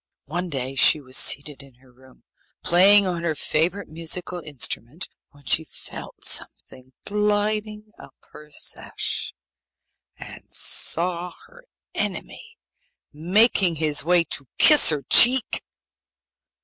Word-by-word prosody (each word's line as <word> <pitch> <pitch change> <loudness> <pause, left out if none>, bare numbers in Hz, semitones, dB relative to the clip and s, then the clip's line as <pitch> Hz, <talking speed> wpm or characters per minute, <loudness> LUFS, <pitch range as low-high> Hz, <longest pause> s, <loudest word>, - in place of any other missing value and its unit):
One 175 +5 -5
day 135 -3 -5
she 135 +3 +4
was 130 -2 -8
seated 145 +1 +2
in 135 -2 -19
her 130 +1 -25
room, 130 +1 -23 0.4
playing 195 +4 +4
on 175 -2 -3
her 165 -2 -3
favourite 175 +7 -2
musical 170 +3 -4
instrument, 150 0 -3 0.2
when 145 -1 -23
she 160 - +2
felt - - -10
something 130 +1 -3
gliding 210 +1 -2
up - - -15 0.2
her 150 0 -15
sash, - - -4 0.9
and - - -13
saw 175 +1 +1
her - - -20 0.3
enemy 455 0 -5 0.6
making 185 +3 +2
his 150 -1 -1
way 175 +1 +2
to 145 -4 -1
kiss 300 -1 +7
her 150 -3 -1
cheek. 250 - +4
170 Hz, 120 wpm, -22 LUFS, 145-200 Hz, 0.9 s, kiss